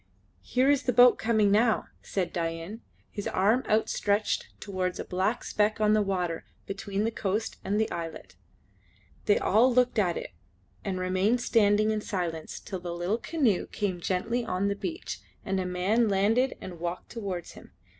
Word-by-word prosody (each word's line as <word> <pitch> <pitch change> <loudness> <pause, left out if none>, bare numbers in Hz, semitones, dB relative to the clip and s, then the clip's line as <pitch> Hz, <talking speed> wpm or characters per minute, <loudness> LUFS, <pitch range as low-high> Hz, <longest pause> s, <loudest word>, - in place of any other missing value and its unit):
"Here 255 +2 +1
is 285 -1 +4
the 250 - 0
boat 245 +1 +7
coming 220 -3 +3
now," 220 +2 +3 0.2
said 190 -3 -2
Dain, 165 +5 -3 0.3
his 205 - -4
arm 215 +7 +2
outstretched 210 -1 +1
towards 185 -3 -3
a - - -4
black 190 +6 -1
speck 215 +1 +1
on 215 0 +4
the 215 - +4
water 180 -4 -1 0.2
between 195 +1 -3
the 225 - 0
coast 215 +1 -2
and 205 +2 0
the 220 - 0
islet. 165 -2 -6 0.9
They 205 - +4
all 230 +6 +4
looked 250 -1 +3
at 180 -4 +1
it - - -6 0.5
and 190 -2 -2
remained 185 +6 +1
standing 215 -2 +3
in 215 -1 -1
silence 170 -6 -4
till 190 - -6
the 175 -1 -5
little 180 +6 -1
canoe 255 - +1
came 195 -4 -2
gently 225 +8 -1
on 200 -2 -1
the 200 - -1
beach 335 - -5 0.3
and 195 -1 0
a 185 - -2
man 200 +6 +2
landed 220 +7 +2
and 175 -3 -8
walked 175 +1 -5
towards 195 -7 -5
them. - - -15
205 Hz, 170 wpm, -28 LUFS, 185-225 Hz, 0.9 s, boat